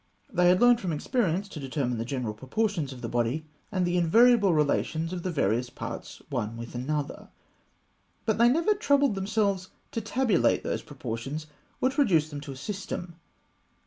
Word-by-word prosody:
They 180 -1 +5
had 180 +1 +5
learned 245 -1 +6
from 180 - -2
experience 190 - 0
to 160 - -7
determine 130 -3 -2
the 115 - -2
general 125 -4 -3
proportions 155 - -1
of 130 -2 -9
the - - -2
body, 120 +6 -1 0.3
and 185 -3 +1
the 175 0 +1
invariable 220 +4 +5
relations 160 +2 +1
of 180 - -3
the 185 - -2
various 120 - 0
parts - - -7
one 110 +2 -2
with 115 0 -7
another; 145 +4 -3 1.0
but 220 -1 +1
they 235 +1 +7
never 335 +11 +3
troubled 285 - +3
themselves 195 -1 0 0.2
to 230 - -2
tabulate 225 -3 +2
those - - -2
proportions, 135 +3 -5 0.4
or 260 - +3
to 275 - +1
reduce 160 - +3
them 145 -1 -5
to 140 - -7
a - - -7
system. 175 +2 -5
170 Hz, 175 wpm, -28 LUFS, 135-215 Hz, 1.0 s, they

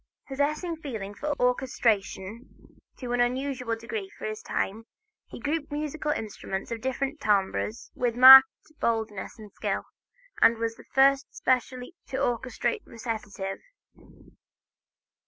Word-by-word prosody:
Possessing 305 +5 -1
feeling 220 -10 -6
for 295 +6 -4
orchestration 230 -3 -1 0.2
to 245 -2 -5
an 245 - +2
unusual 250 -1 -1
degree 220 -3 -6
for - - -7
his 215 0 -4
time, 220 +4 -3 0.4
he - - -10
grouped 295 +1 -3
musical 300 +1 -3
instruments 215 -8 -4
of 230 -1 -4
different 270 +3 -2
timbres 190 - 0
with 240 -2 -1
marked 265 +2 +11 0.3
boldness 220 -4 -2
and 210 -2 -13
skill, - - -2 0.6
and 230 - +6
was 230 0 -2
the - - -16
first 270 0 +4
specially 255 +2 -1
to - - -6
orchestrate 260 - -1
recitative. 210 -4 -5
245 Hz, 120 wpm, -27 LUFS, 220-270 Hz, 0.6 s, marked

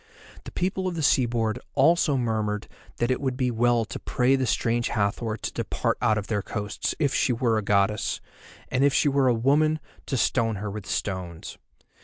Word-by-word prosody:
The - - -8
people 185 +1 -1
of 180 - -3
the 160 - -2
seaboard 120 -4 +2 0.2
also 150 0 +4
murmured 110 -4 -1 0.3
that 120 +2 0
it 130 - -1
would 130 -2 -1
be 125 -2 +1
well 120 0 +2
to - - -7
pray 125 +2 +2
the 130 -2 0
Strange 120 +1 +1
Hathor 110 +1 -1
to - - -5
depart - - -1
out 110 -3 +3
of 105 - -3
their 105 -2 -1
coasts, 105 0 -3
if 145 -4 +1
she - - +2
were 115 -2 +1
a - - -3
goddess; 100 +1 +1 0.5
and 125 +1 +1
if 140 -1 +3
she - - +3
were 140 -1 +2
a 125 - +4
woman 150 +6 +2 0.3
to 135 - -1
stone 115 -1 +1
her 105 +1 -4
with 100 -1 -7
stones. 90 -3 -4
120 Hz, 195 wpm, -26 LUFS, 105-135 Hz, 0.5 s, also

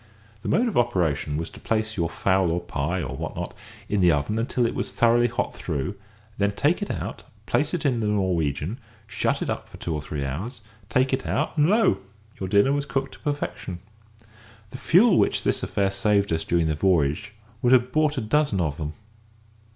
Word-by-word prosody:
The - - -4
mode 245 +2 +3
of 220 - +1
operation 80 -10 0
was 80 +1 -4
to - - -12
place 110 0 -1
your 85 -3 0
fowl 95 0 +2
or 85 +1 0
pie, 85 +1 -2
or 65 -1 -5
what - - -5
not, - - -4 0.3
in 105 -2 +1
the 90 -1 +6
oven 75 +9 0
until 120 +1 0
it 115 - 0
was - - -3
thoroughly 120 +1 +4
hot 120 +1 -2
through, 80 +3 -3 0.5
then 100 0 +2
take 150 - +1
it 205 - -3
out, - - -4 0.2
place - - +1
it 165 - -4
in 125 -4 +2
the 110 - 0
"Norwegian," 90 - 0 0.3
shut - - -1
it - - -4
up - - -5
for - - -12
two 85 - -3
or 75 - -2
three 70 -1 -4
hours, 105 - -5 0.3
take 130 +3 +2
it 130 - -1
out, 150 - -1
and 150 +1 +4
lo! 210 - +4 0.4
your 95 - -3
dinner 100 +7 +4
was 145 0 -1
cooked 135 -1 -2
to - - -14
perfection. 145 -10 -3 0.9
The 130 - -8
fuel 185 +7 +5
which - - +2
this - - +1
affair 100 -1 0
saved 100 -1 +2
us 80 0 0
during 85 -1 +1
the 80 - +1
voyage 90 +4 +1 0.3
would 125 -2 +3
have 125 -1 +5
bought 155 0 +2
a - - 0
dozen 115 -1 +1
of 75 -5 -1
them. 75 -1 -4
100 Hz, 205 wpm, -25 LUFS, 85-130 Hz, 0.9 s, the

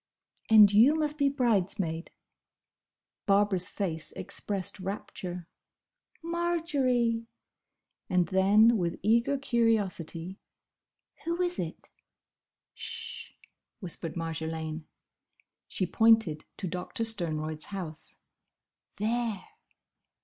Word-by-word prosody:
"And 210 -2 +8
you 240 +9 +6
must 305 -1 -1
be 280 -1 +4
bridesmaid!" 195 -10 0 1.2
Barbara's 200 -2 +4
face 160 -6 -3
expressed 195 -1 -3
rapture. 180 -2 -6 0.8
"Marjory!" 285 -9 0 0.8
And 180 -2 +2
then 210 +5 +5
with 170 -1 -2
eager 235 +6 +3
curiosity, 205 - 0 0.8
"Who 340 +1 -2
is 355 0 -2
it?" - - -5 0.9
"Sh!" - - -6 0.5
whispered 170 -4 -3
Marjolaine. 160 -1 -4 0.8
She 185 - -1
pointed 220 -5 +3
to 190 - -4
Doctor 180 +7 -4
Sternroyd's 155 -8 -1
house. 170 -6 -5 0.7
"There!" 225 0 -1
200 Hz, 85 wpm, -29 LUFS, 170-235 Hz, 1.2 s, And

